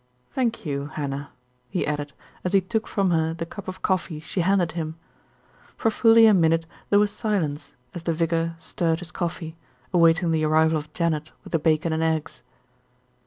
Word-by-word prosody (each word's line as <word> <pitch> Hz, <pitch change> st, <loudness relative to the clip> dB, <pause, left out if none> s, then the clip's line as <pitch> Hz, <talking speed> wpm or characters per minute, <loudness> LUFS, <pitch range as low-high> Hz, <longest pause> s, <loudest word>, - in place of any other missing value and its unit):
Thank 240 Hz, -7 st, -1 dB
you, 140 Hz, -1 st, -2 dB
Hannah," 140 Hz, -1 st, -4 dB, 0.4 s
he 180 Hz, -, -1 dB
added, 145 Hz, -1 st, -3 dB, 0.3 s
as 180 Hz, -, -2 dB
he 195 Hz, -, +5 dB
took 220 Hz, +4 st, -2 dB
from 195 Hz, -3 st, +1 dB
her 160 Hz, -1 st, +1 dB
the 165 Hz, 0 st, -4 dB
cup 200 Hz, +4 st, -9 dB
of 185 Hz, 0 st, -7 dB
coffee 185 Hz, -4 st, 0 dB
she 170 Hz, +4 st, -3 dB
handed 180 Hz, -2 st, +2 dB
him. 160 Hz, -2 st, -4 dB, 0.8 s
For 225 Hz, -, +1 dB
fully 225 Hz, 0 st, +6 dB
a 220 Hz, -, +7 dB
minute 165 Hz, -2 st, +3 dB, 0.2 s
there 205 Hz, -, +5 dB
was 205 Hz, 0 st, +3 dB
silence 160 Hz, -, -2 dB, 0.2 s
as 175 Hz, -, -6 dB
the 165 Hz, 0 st, -1 dB
vicar 165 Hz, 0 st, 0 dB
stirred 165 Hz, 0 st, -1 dB
his 175 Hz, -1 st, -8 dB
coffee, 170 Hz, -2 st, -4 dB, 0.4 s
awaiting 165 Hz, 0 st, +4 dB
the 160 Hz, -1 st, +1 dB
arrival 160 Hz, +1 st, +3 dB
of 150 Hz, +1 st, -11 dB
Janet 155 Hz, -2 st, -1 dB
with -, -, -12 dB
the 165 Hz, -, +3 dB
bacon 160 Hz, +1 st, +1 dB
and 160 Hz, -, 0 dB
eggs. 160 Hz, -1 st, -1 dB
165 Hz, 180 wpm, -24 LUFS, 155-185 Hz, 0.8 s, a